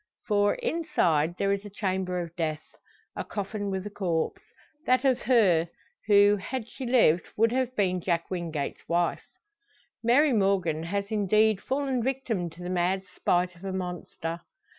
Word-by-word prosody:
For, 205 -1 +2
inside 175 - 0
there 200 0 +1
is 200 0 -1
a 205 - -8
chamber 190 -2 -2
of 170 -1 -6
death; 155 -2 -2 0.5
a - - -3
coffin 205 0 -4
with 190 0 -3
a 210 - -6
corpse 180 - -1 0.5
that 255 +2 +3
of 260 -2 +3
her, 185 -10 +3 0.4
who, 205 0 +6
had 225 +4 -5
she 255 +1 -7
lived, 225 -9 +4
would 225 +1 +4
have 255 0 -1
been 185 -3 +1
Jack 170 0 -1
Wingate's 165 -6 -4
wife. 170 +1 0 0.7
Mary 260 +5 +4
Morgan 195 -7 +1
has 200 +5 -3
indeed 215 0 +3
fallen 270 -2 -1
victim 240 -8 -2
to 170 +2 -12
the 180 - -4
mad 185 +2 +1
spite 180 0 +1
of 175 - -17
a 195 - -3
monster. 180 -2 -5
195 Hz, 160 wpm, -27 LUFS, 175-225 Hz, 0.7 s, who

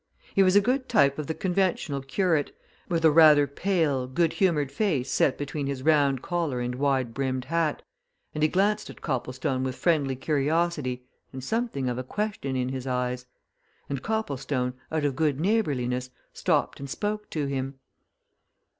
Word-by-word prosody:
He 195 - +4
was 185 0 +4
a 205 - +7
good 255 +4 0
type 140 +1 +3
of 150 - -4
the 160 - -2
conventional 180 -6 0
curate, 155 +2 0 0.3
with 165 -2 +1
a 160 - +7
rather 150 -2 +7
pale, 145 -4 0
good 160 +5 +1
humoured 150 -8 +1
face 140 - 0
set 130 - +2
between 145 0 -3
his 135 -2 -4
round 140 -4 +3
collar 165 -8 -1
and 125 0 -2
wide 130 -2 0
brimmed 130 -1 -2
hat, 160 +1 0 0.5
and 150 - -4
he 155 - +4
glanced 210 +4 +1
at - - -11
Copplestone 130 0 -2
with 130 -1 -2
friendly 145 -6 +1
curiosity 145 -1 0 0.3
and 130 -1 -7
something 225 - -1
of 125 0 -2
a - - -3
question 200 -4 -3
in 125 0 -1
his 130 0 -5
eyes. 125 0 -2 0.6
And 140 -2 -3
Copplestone, 140 -11 -2 0.2
out 155 -2 0
of 140 -2 0
good 150 -2 +1
neighbourliness, 135 - 0 0.2
stopped - - 0
and 140 0 -7
spoke 210 +6 -3
to 150 -3 -2
him. 135 0 -3
145 Hz, 165 wpm, -26 LUFS, 130-170 Hz, 0.6 s, a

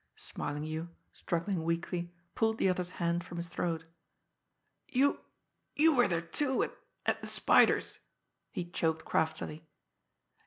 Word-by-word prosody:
Smarlinghue, 155 +3 -4 0.3
struggling 170 0 -2
weakly, 170 +1 -2 0.2
pulled 220 -1 +1
the - - +3
other's 180 -1 -1
hand 170 0 0
from 175 0 -8
his 170 - -3
throat. 165 -1 -2 1.0
"You 275 +3 +3 0.6
you 315 0 +6
were 245 -1 +5
there, 170 -3 0
too, 265 - +2
at - - -4 0.3
at - - +1
the - - -6
Spider's," - - +4 0.5
he 175 - -4
choked 160 -2 -1
craftily. 160 0 -1
170 Hz, 125 wpm, -32 LUFS, 165-195 Hz, 1.0 s, you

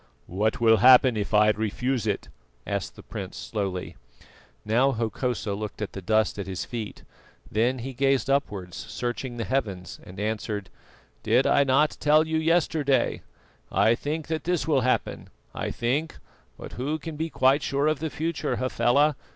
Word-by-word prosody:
"What 105 +5 -1
will 110 -1 +5
happen 125 +2 +7
if 105 -1 -3
I 105 0 +5
refuse 110 +3 -2
it?" 100 - -2 0.4
asked - - -3
the - - -13
prince - - -7
slowly. 95 -4 -4 0.7
Now 125 +6 +3
Hokosa 115 -1 -2
looked 105 +1 -5
at 105 - -4
the 95 - -6
dust 110 +2 +1
at 100 - -4
his 95 -1 -4
feet, 115 -4 -6 0.5
then 120 +4 +1
he 130 +2 -6
gazed 135 -1 +1
upwards 105 -10 -1
searching 120 +2 -4
the 115 - -2
heavens, 100 -5 -3
and 95 +2 -11
answered: 105 -1 -3 0.5
"Did - - +3
not 140 -1 +3
I 145 +4 +5
tell 155 +1 +4
you 160 0 -1
yesterday? 155 -5 +1 0.5
I 115 - +4
think 150 +5 -3
that 160 -1 -3
this 175 -5 0
will 145 -4 +3
happen. 125 +1 -1 0.2
I - - -3
think 140 +7 -1 0.4
but - - -9
who 145 +5 -2
can 160 +1 -7
be 160 +2 -3
quite 135 0 +3
sure 140 +1 0
of 155 -2 +1
the 160 +1 -2
future, 160 +2 -2
Hafela? 130 +3 +2
125 Hz, 165 wpm, -26 LUFS, 110-145 Hz, 0.7 s, happen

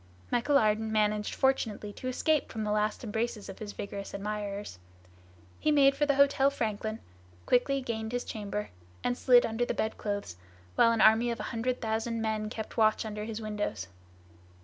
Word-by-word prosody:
Michel 280 +4 +3
Ardan 220 -1 +2
managed 210 -1 +1
fortunately 220 -6 0
to 255 - -7
escape 300 +4 +1
from 220 - -3
the 210 - -1
last 210 +2 0
embraces 220 -1 -3
of 195 - -9
his 210 -1 -6
vigorous 200 -1 -6
admirers. 205 - -4 0.8
He - - +1
made 275 -2 +5
for 295 +1 +1
the 285 - +3
Hotel 280 0 +4
Franklin, 220 -4 -3 0.5
quickly 270 +2 +2
gained 220 -3 -4
his 245 0 -2
chamber, 210 -1 -5 0.3
and 245 - +1
slid 245 -1 +5
under 225 +2 -1
the - - -1
bedclothes, 205 - -3 0.4
while 230 - +5
an 230 -1 +1
army 225 +2 +6
of 230 -1 -3
a - - -3
hundred 245 +2 -1
thousand 225 +1 -1
men 215 -1 -1
kept 220 +1 -7
watch 220 0 +3
under 210 -1 -4
his 225 0 -5
windows. 205 - -3
220 Hz, 170 wpm, -30 LUFS, 210-245 Hz, 0.8 s, army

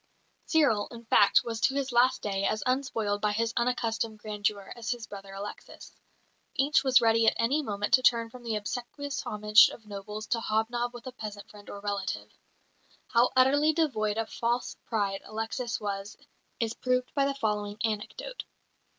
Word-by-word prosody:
Cyril, 280 -11 +3
in 235 -1 -11
fact, 205 -2 +5
was 230 -1 -4
to 270 +1 +2
his 275 -2 -1
last 245 +2 +3
day 195 -1 -1
as 215 +2 0
unspoiled 255 -6 0
by 210 -1 +1
his 230 +2 0
unaccustomed 230 -2 -1
grandeur 210 -1 -3
as 235 -1 -6
his 240 -2 -2
brother 195 -2 -10
Alexis. 200 +1 -9 0.6
Each 280 +2 +3
was 260 -2 +5
ready 225 0 +4
at - - +5
any 265 +7 +2
moment 205 -6 -3
to 255 - +7
turn 230 -2 +3
from 250 - -11
the 230 -2 -2
obsequious 250 +6 -4
homage 210 +1 +5
of 220 - -12
nobles 210 +1 -7
to 235 - +1
hobnob 235 +2 -1
with 240 - -10
a 255 - -5
peasant 210 -4 -8
friend 205 -1 -13
or 200 - -7
relative. 200 -2 -3 0.8
How 240 0 +4
utterly 285 +4 +5
devoid 220 -10 0
of 225 0 -2
false 240 +1 -1
pride 200 -4 -1
Alexis 225 +2 -3
was 200 -1 -4 0.4
is 230 -1 -1
proved 250 0 -1
by 275 -1 +2
the 275 0 -1
following 210 -4 -2
anecdote. 225 - -3
225 Hz, 170 wpm, -29 LUFS, 210-250 Hz, 0.8 s, to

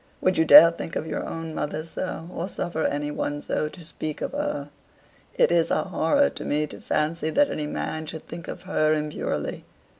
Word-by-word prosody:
Would 185 - +2
you 160 - +3
dare 165 +2 +10
think 165 0 -7
of - - -2
your 160 - -3
own 165 -1 -5
mother 155 +1 -3
so, 165 0 -5
or 170 - -3
suffer 175 -4 -2
any 145 +1 -1
one 145 0 -2
so 150 +1 -2
to 170 0 -12
speak 155 -1 -5
of - - -2
her? 285 - -3 0.6
It - - +4
is 170 -1 +3
a - - +1
horror 190 - +2
to - - -7
me 150 +1 0
to 150 - -11
fancy 155 +1 0
that 290 - +3
any 150 -1 -2
man 155 +1 -4
should 160 0 -7
think 170 - -8
of - - -7
her 155 -4 +2
impurely. 150 0 -3
160 Hz, 205 wpm, -25 LUFS, 150-170 Hz, 0.6 s, dare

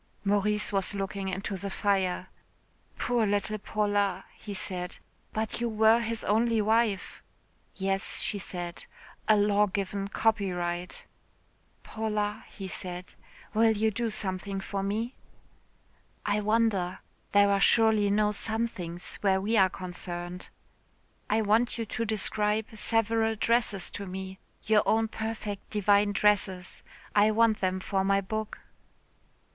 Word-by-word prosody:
'" - - -38
Maurice 205 +1 +1
was 195 0 0
looking 195 0 -3
into 195 +1 -3
the 195 +2 -5
fire. 190 -2 0 0.7
"Poor 240 -3 +1
little 205 +1 -1
Paula," 205 -2 0
he 210 - -9
said. 180 -2 -4 0.4
"But 220 +2 -2
you 235 - +1
were 220 +1 +5
his 230 -1 -3
only 225 +2 +2
wife." 215 -2 +1 0.5
"Yes," 195 0 0
she 205 - -1
said, 175 -3 -6 0.4
"a 215 - +6
law 205 0 +3
given 195 0 -3
copyright." 180 -5 -1 0.8
"Paula," 210 -1 -2
he 195 - -7
said, 180 -1 -6 0.4
"will 225 +1 +4
you 220 +1 +1
do 230 +2 -1
something 195 -1 -3
for 195 +1 -3
me?" 220 +5 -2 1.1
"I 205 0 +1
wonder. 205 -4 +1 0.3
There 200 0 +5
are 200 0 +2
surely 220 -1 +5
no 210 +1 +3
somethings 210 -6 -3
where 190 -2 +3
we 210 +4 0
are 190 -3 +5
concerned." 180 -1 -6 0.8
"I 220 +1 +2
want 225 +4 +2
you 230 - -2
to 225 +2 -3
describe 215 0 +1
several 225 0 +2
dresses 220 -4 +1
to 200 - -6
me. 190 +1 -6 0.2
Your 215 0 +4
own 225 0 +2
perfect 220 -2 -5
divine 205 0 +3
dresses. 195 -3 +1 0.3
I 210 +1 +6
want 220 0 +3
them 185 0 0
for 190 +1 -1
my 195 0 +3
book." 215 +2 -4
205 Hz, 130 wpm, -28 LUFS, 190-220 Hz, 1.1 s, a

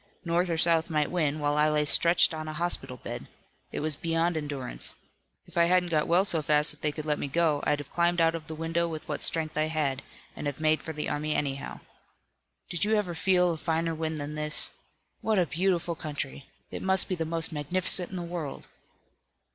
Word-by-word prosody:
North 170 +2 +1
or 165 - 0
South 165 0 +3
might 150 -2 0
win, 155 -4 0
while 145 0 0
I 155 +1 +4
lay 150 0 +1
stretched 170 +3 +5
on 155 0 -5
a 155 - -4
hospital 160 -6 -2
bed. - - -7 0.4
It - - -4
was 155 -1 -1
beyond 165 +2 0
endurance. 145 -5 0 0.5
If - - -12
I 170 - +6
hadn't 180 0 +2
got 155 -2 +1
well 180 +3 +4
so 165 -5 +1
fast 150 +1 +4
that - - -7
they 150 - +1
could 155 0 -7
let 150 -1 0
me - - -3
go, 155 0 +1
I'd 150 - +2
have 145 -2 -9
climbed 175 0 +1
out 165 0 +4
of 165 -2 -6
the 160 - -6
window 165 +2 -1
with 155 -1 -7
what 150 - -3
strength 155 -2 +1
I 155 - +3
had, 145 -4 -1 0.3
and 145 - -4
have 145 0 -4
made 155 0 +2
for 160 - -6
the 150 -1 -4
army 150 +1 -2
anyhow. 140 -1 -3 0.9
Did 175 0 -2
you 215 +1 +3
ever 200 -5 -1
feel 180 +1 +3
a 165 - -3
finer 165 +1 -1
wind 160 0 -3
than 145 0 -5
this? 150 0 +2 0.5
What 220 -1 +1
a 180 - +3
beautiful 175 0 0
country! 145 -3 -6 0.2
It - - -5
must 190 0 +3
be - - -2
the 165 -3 -1
most 165 0 0
magnificent 175 +4 +1
in 190 - -8
the 175 - -4
world!" 170 -5 -6
160 Hz, 220 wpm, -28 LUFS, 150-170 Hz, 0.9 s, I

